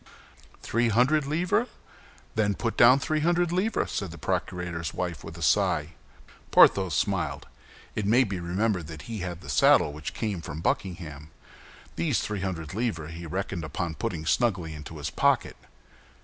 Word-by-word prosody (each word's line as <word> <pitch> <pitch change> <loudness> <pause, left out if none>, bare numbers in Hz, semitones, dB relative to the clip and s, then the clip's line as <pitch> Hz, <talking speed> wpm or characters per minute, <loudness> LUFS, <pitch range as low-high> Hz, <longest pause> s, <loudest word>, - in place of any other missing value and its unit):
"Three 115 +1 +1
hundred 135 +6 +3
livres? 175 - +1 0.7
Then 105 -2 +1
put 115 +2 -2
down 125 +3 +7
three 155 +2 -1
hundred 175 +2 +2
livres," 190 +6 0
said 95 - -2
the 85 - -9
procurator's 85 -1 -3
wife, 90 -3 -3
with 80 - -9
a 85 - -5
sigh. 65 - +2 0.6
Porthos 95 -6 +5
smiled. - - -1 0.5
It 105 -2 -2
may 120 +5 +5
be 100 -6 -3
remembered 90 0 -1
that 80 -1 -9
he 115 -2 -6
had 90 -1 -5
the - - -12
saddle 70 +2 +4
which 75 0 -6
came 105 -6 -2
from 80 -1 -6
Buckingham. 80 -4 -3 0.7
These - - +1
three 105 -2 -3
hundred 85 -4 -4
livres 90 -8 -2
he 85 0 -7
reckoned 95 0 -3
upon 85 +1 -3
putting 80 +1 -4
snugly 90 -7 +1
into 75 +1 -9
his 75 +1 -4
pocket. - - +2
95 Hz, 160 wpm, -27 LUFS, 80-115 Hz, 0.7 s, down